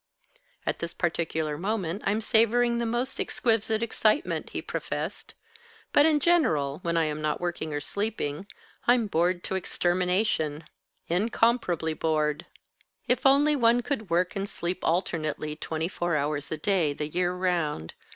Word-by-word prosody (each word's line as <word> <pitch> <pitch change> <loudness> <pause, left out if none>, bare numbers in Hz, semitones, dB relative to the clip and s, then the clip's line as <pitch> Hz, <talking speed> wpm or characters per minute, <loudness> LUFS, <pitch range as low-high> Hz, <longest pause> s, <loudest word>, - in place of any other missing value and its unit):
"At - - -1
this 170 - -5
particular 160 -3 -1
moment 195 -2 -2
I'm 210 +3 +1
savouring 235 +1 +3
the 235 - -1
most 240 +3 -2
exquisite 225 -1 0
excitement," 230 - +1
he - - -4
professed. - - -5 0.6
"But 290 +2 +6
in 305 -2 +3
general, 165 - +2
when 170 -2 0
I 165 - +4
am 155 0 -3
not 155 0 -1
working 170 -3 -3
or 145 - -1
sleeping, 200 -2 -3 0.4
I'm 240 -1 +5
bored 175 -1 +1
to - - -3
extermination 180 -3 0 0.4
incomparably 185 -3 +1
bored. 155 -2 0 0.6
If 255 +2 +3
only 290 +2 +5
one 240 -2 +4
could 240 -6 -3
work 175 +2 +1
and 200 0 -2
sleep 180 -2 -3
alternately, 155 -3 -1
twenty 160 +1 -3
four 175 -2 -1
hours 145 0 -2
a 155 - -1
day, 165 -3 +1
the 150 +1 -4
year 180 +3 0
round! 170 - -1
180 Hz, 145 wpm, -27 LUFS, 155-225 Hz, 0.6 s, But